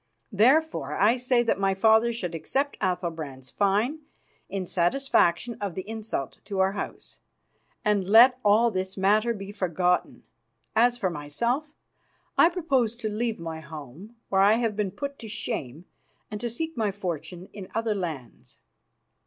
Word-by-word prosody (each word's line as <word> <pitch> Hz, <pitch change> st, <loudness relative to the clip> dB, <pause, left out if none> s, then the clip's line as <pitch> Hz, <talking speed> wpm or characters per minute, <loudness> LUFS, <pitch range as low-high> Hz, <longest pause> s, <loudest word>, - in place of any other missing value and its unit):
Therefore 215 Hz, -, +2 dB
I 215 Hz, +5 st, +5 dB
say 250 Hz, -1 st, +2 dB
that 230 Hz, -, 0 dB
my 195 Hz, -1 st, +1 dB
father 220 Hz, +3 st, +4 dB
should 185 Hz, -7 st, -4 dB
accept 270 Hz, -, -2 dB
Athalbrand's 165 Hz, -8 st, -3 dB
fine 210 Hz, +9 st, +1 dB, 0.5 s
in 195 Hz, -2 st, -3 dB
satisfaction 185 Hz, +2 st, +1 dB
of 200 Hz, -4 st, -3 dB
the 190 Hz, -, -5 dB
insult 220 Hz, -, -5 dB
to 200 Hz, -1 st, -5 dB
our 190 Hz, 0 st, +3 dB
House, 200 Hz, -, -7 dB, 0.7 s
and 205 Hz, -3 st, +2 dB
let 245 Hz, +4 st, +7 dB
all 220 Hz, +3 st, +4 dB
this 190 Hz, 0 st, -3 dB
matter 210 Hz, +4 st, +3 dB
be 200 Hz, -3 st, -6 dB
forgotten. 180 Hz, -2 st, 0 dB, 0.5 s
As 240 Hz, +1 st, +4 dB
for 190 Hz, -6 st, -1 dB
myself, 235 Hz, -, -2 dB, 0.6 s
I 330 Hz, -, +6 dB
purpose 275 Hz, -, 0 dB
to 225 Hz, -2 st, -4 dB
leave 220 Hz, 0 st, -2 dB
my 165 Hz, -1 st, -5 dB
home, 155 Hz, -, -10 dB
where 190 Hz, 0 st, +3 dB
I 200 Hz, +2 st, +6 dB
have 225 Hz, -2 st, 0 dB
been 210 Hz, -2 st, -1 dB
put 280 Hz, +9 st, -6 dB
to 230 Hz, -, -8 dB
shame, 175 Hz, -, -5 dB, 0.5 s
and 210 Hz, 0 st, -5 dB
to 240 Hz, -, -2 dB
seek 320 Hz, +8 st, -4 dB
my 220 Hz, -3 st, 0 dB
fortune 180 Hz, -2 st, -5 dB
in 195 Hz, -3 st, -8 dB
other 225 Hz, -1 st, 0 dB
lands." 160 Hz, -, -6 dB
205 Hz, 155 wpm, -26 LUFS, 180-235 Hz, 0.7 s, let